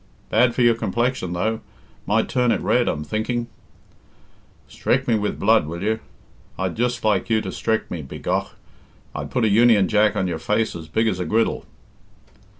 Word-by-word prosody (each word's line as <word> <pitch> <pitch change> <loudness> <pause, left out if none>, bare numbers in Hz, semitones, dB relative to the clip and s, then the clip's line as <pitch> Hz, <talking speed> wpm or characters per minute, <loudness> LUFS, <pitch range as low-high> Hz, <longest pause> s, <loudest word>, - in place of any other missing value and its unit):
"Bad 120 -1 +3
for 125 - +2
your 120 -1 +6
complexion, 115 -3 -1
though; 110 +5 -1 0.5
might 110 +2 +2
turn 125 -2 +1
it - - +1
red, 125 -1 +2
I'm 75 - -1
thinking." 115 +7 -2 1.2
"Strek - - -1
me 120 - +3
with 105 -1 -1
blood 110 -6 +3
will 85 +3 -5
you? 110 +1 0 0.6
I'd 95 -1 -2
just 120 +1 -1
like 105 -2 +1
you 110 -1 +3
to - - -5
strek 110 -1 -2
me, 85 - -4
begough. 65 - -3 0.6
I'd - - -5
put 125 -3 0
a - - +4
Union 110 -2 +5
Jack 105 -1 +3
on 95 - 0
your 85 -3 -3
face 105 +6 0
as 80 -2 -8
big 110 +5 +1
as 95 -4 -1
a 90 - -2
griddle." 110 +7 0
110 Hz, 180 wpm, -22 LUFS, 95-115 Hz, 1.2 s, your